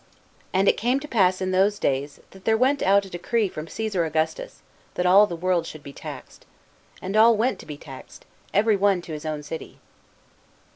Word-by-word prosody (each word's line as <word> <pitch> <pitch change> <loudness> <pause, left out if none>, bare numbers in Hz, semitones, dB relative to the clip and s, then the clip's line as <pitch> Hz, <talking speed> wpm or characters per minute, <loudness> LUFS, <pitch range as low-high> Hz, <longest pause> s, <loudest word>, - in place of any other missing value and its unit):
" - - -35
And 190 +2 +2
it - - +4
came 245 +5 +1
to 300 - -9
pass 190 -8 +2
in 185 0 -1
those 195 +3 +2
days, 140 -1 -2
that 190 0 -16
there 220 +2 +2
went 265 +4 +2
out 200 +1 +3
a - - -11
decree 210 +5 0
from 155 -3 -7
Ca.sar 210 -2 -2
Augustus, 160 - -3 0.3
that 180 - -1
all 195 +3 +6
the 175 - -5
world 175 -1 0
should 155 -2 -10
be 140 - -10
taxed.... - - -10 0.6
And 190 +2 -4
all 225 +1 +6
went 240 +4 0
to - - -12
be 150 - -7
taxed, 135 -3 -12 0.3
every 215 +2 +3
one 200 0 +3
into 175 -3 -6
his 150 +1 -6
own 150 -1 -4
city." 160 +2 -8
185 Hz, 205 wpm, -24 LUFS, 160-215 Hz, 0.6 s, all